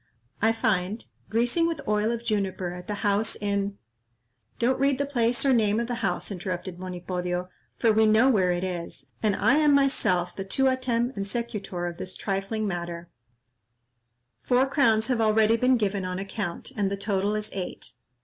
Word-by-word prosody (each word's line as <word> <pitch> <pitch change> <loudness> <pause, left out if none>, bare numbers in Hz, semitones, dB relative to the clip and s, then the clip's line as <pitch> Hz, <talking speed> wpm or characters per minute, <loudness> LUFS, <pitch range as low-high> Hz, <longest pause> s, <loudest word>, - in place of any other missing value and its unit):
"I 225 +1 +4
find, 205 -1 0 0.2
'Greasing 240 +9 +2
with 335 -2 -2
oil 210 +1 +2
of 235 0 -3
juniper 190 -4 -1
at 180 0 -9
the 205 -1 -4
house 205 +2 +1
in—'" 200 -1 -2 0.8
"Don't 250 +3 +1
read 275 0 +3
the 280 - 0
place 245 -2 +1
or 270 - +5
name 215 -2 +3
of 235 - 0
the 240 -1 -4
house," 195 0 -1
interrupted 185 -1 -4
Monipodio, 180 0 -3 0.3
"for 225 -2 +3
we 220 0 +4
know 220 +4 +5
where 190 -8 +3
it 175 +1 -1
is, 175 -2 -5
and 210 -3 +2
I 280 - +3
am 300 -2 +5
myself 185 -11 +2
the 195 - -4
tuautem 255 +2 +1
and 200 - -2
secutor 200 -6 -3
of 170 -1 -6
this 185 - -6
trifling 200 +2 -2
matter; 175 -2 -5 1.3
four 255 +1 +3
crowns 230 -6 +3
have 245 -2 0
already 220 0 +4
been 250 +2 +3
given 200 -3 -1
on 185 0 -3
account, 195 +1 -5
and 205 -3 +1
the 200 - -3
total 200 0 0
is 215 0 -4
eight." 185 -2 -6
210 Hz, 175 wpm, -26 LUFS, 185-235 Hz, 1.3 s, or